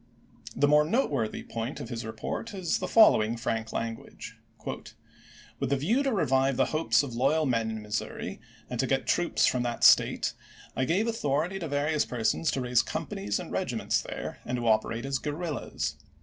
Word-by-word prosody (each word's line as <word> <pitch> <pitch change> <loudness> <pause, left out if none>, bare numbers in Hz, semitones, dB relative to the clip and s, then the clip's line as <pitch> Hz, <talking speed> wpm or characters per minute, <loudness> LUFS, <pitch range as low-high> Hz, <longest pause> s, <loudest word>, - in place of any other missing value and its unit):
The 145 - +3
more 150 +1 +5
noteworthy 150 - 0
point 115 +4 -5
of - - -7
his 120 -2 -4
report 110 - -5
^%'.^u}" 205 - -8
is 180 -3 0
the - - -3
following 115 - +5
frank 115 -2 -2
language: 115 0 -5 0.3
"With - - -8
the 140 - +2
view 210 - +1
to 275 -1 0
revive 135 - +2
the - - +4
hopes 130 -6 +3
of 135 -4 -6
loyal 140 +6 +2
men 115 -4 +1
in 110 -1 -5
Missouri, 105 +1 -4 0.3
and - - -5
to - - +1
get - - 0
troops - - +2
from 125 - +2
that 120 -1 -3
State, - - +5 0.4
I 130 - +1
gave 190 - +1
authority 175 -3 -1
to 170 - -4
various 145 +1 +1
persons 125 +6 0
to 135 - -1
raise 125 -1 +3
companies 100 +1 -3
and - - -7
regiments - - 0
there, - - -6
and 125 - -3
to 120 -1 -2
operate 115 +2 +1
as 135 -1 -1
guerrillas. 150 0 -3
135 Hz, 180 wpm, -28 LUFS, 115-155 Hz, 0.4 s, more